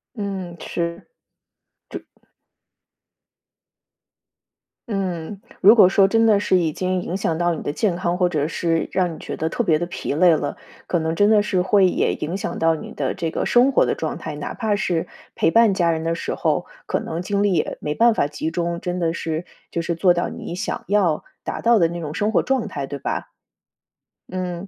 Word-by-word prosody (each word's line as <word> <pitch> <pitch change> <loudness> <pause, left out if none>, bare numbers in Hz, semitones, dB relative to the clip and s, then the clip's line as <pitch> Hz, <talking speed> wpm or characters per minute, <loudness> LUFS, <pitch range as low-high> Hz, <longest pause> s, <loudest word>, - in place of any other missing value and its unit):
嗯， 190 -4 -5
是， 170 0 -4 0.8
这 - - -7 2.9
嗯， 190 -1 -3 0.2
如 205 +4 +8
果 190 -5 +7
说 195 0 +4
真 225 +2 +3
的 215 -3 +5
是 185 -2 +2
已 165 -3 +1
经 185 +2 -1
影 180 +2 -3
响 165 -4 -1
到 175 0 +1
你 - - -5
的 145 - -3
健 190 -3 0
康， 175 0 -1
或 180 -1 +2
者 150 -3 0
是 165 0 -1
让 180 -2 +1
你 - - -10
觉 - - -6
得 160 +1 -2
特 - - -2
别 165 -9 +3
地 175 - -2
疲 175 - -4
累 175 +4 +5
了， 155 - -2 0.3
可 175 - +1
能 160 0 -1
真 205 +5 +3
的 210 -2 +5
是 185 -3 +1
会 190 +1 +4
也 - - +1
影 170 +5 -3
响 - - -4
到 165 0 +3
你 155 - -7
的 135 -3 -2
这 170 -3 -3
个 - - -2
生 255 +3 +4
活 - - +4
的 - - 0
状 - - -3
态， - - -6
哪 - - -5
怕 215 -3 -1
是 175 -5 -1 0.3
陪 - - +2
伴 230 -3 +5
家 170 -3 +2
人 160 0 -2
的 165 0 0
时 - - -3
候， - - 0 0.2
可 - - -1
能 165 +2 -4
精 200 +2 0
力 205 - +2
也 165 -4 0
没 150 - -2
办 235 +1 +5
法 145 - +1
集 150 +2 -4
中。 170 0 -2
真 180 0 -3
的 170 -2 0
是， 165 0 -3 0.3
就 170 - -1
是 170 0 -2
做 175 +2 +4
到 175 0 -1
你 175 - -7
想 205 - -4
要 190 -6 +2 0.2
达 - - -4
到 235 -1 +4
的 165 -2 +3
那 170 0 -5
种 150 -2 -5
生 210 +3 0
活 - - +3
状 265 -3 0
态， 140 -6 -4
对 140 - -5
吧？ - - -3 1.0
嗯。 180 0 -4
175 Hz, 225 characters per minute, -22 LUFS, 165-200 Hz, 2.9 s, 如